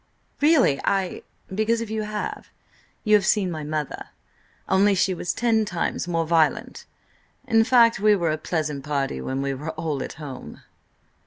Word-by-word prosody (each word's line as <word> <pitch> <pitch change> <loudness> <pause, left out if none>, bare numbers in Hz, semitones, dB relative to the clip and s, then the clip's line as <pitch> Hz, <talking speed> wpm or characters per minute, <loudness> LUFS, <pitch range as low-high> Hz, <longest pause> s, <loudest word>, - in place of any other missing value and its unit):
"Really, 290 - +4
I—" 195 -2 0 0.3
"Because, 220 +3 +1
if 230 -2 -5
you 220 0 -1
have, 210 0 -5 0.5
you 215 - +2
have 210 -2 +6
seen 190 -1 +2
my 155 -2 -5
mother. 150 -1 -4 0.6
Only 200 +1 +4
she 190 0 +2
was 175 0 -2
ten 225 -2 +1
times 175 -3 -2
more 165 -1 0
violent. 160 -2 0 0.6
In 225 0 +4
fact, 230 -3 +4
we 210 +1 +5
were 170 -4 0
a 155 - -1
pleasant 155 -4 -3
party 140 - -2
when 135 - -3
we 140 0 -1
were 145 +4 -6
all 155 -4 -3
at - - -5
home." 145 -5 -9
180 Hz, 165 wpm, -24 LUFS, 155-215 Hz, 0.6 s, have